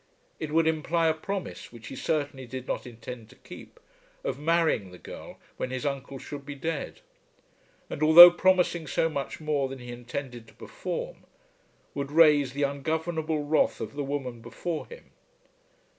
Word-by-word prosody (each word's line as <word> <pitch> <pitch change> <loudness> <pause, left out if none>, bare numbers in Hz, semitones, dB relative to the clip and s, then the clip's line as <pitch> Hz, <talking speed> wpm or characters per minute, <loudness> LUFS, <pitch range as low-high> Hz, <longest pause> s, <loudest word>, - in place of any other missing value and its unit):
It 155 - -4
would 165 +1 +3
imply 160 +1 +1
a - - +3
promise, 190 +4 -6
which 115 -2 -11
he - - -7
certainly 140 -2 -2
did 130 +1 -7
not - - -3
intend 115 -1 -9
to 130 - -17
keep, - - -13 0.4
of - - -3
marrying 160 - +1
the 90 - -12
girl - - -10 0.2
when - - -3
his 130 +2 -4
uncle 140 -1 -3
should 140 +1 -8
be 145 0 -7
dead; 160 - -4 0.9
and, - - -7
although 170 +3 +11
promising 175 -2 +2
so 165 +4 +1
much 140 -3 -4
more 150 -3 -1
than 135 - -7
he 125 -1 -9
intended 120 -1 -7
to - - -19
perform, - - -6 0.8
would 140 0 -4
raise 150 -4 +5
the 145 +1 -1
ungovernable 155 +2 -1
wrath 150 +2 +1
of - - -5
the 145 0 -3
woman 135 -4 -4
before 140 +9 -5
him. 480 - -13
145 Hz, 165 wpm, -27 LUFS, 130-160 Hz, 0.9 s, although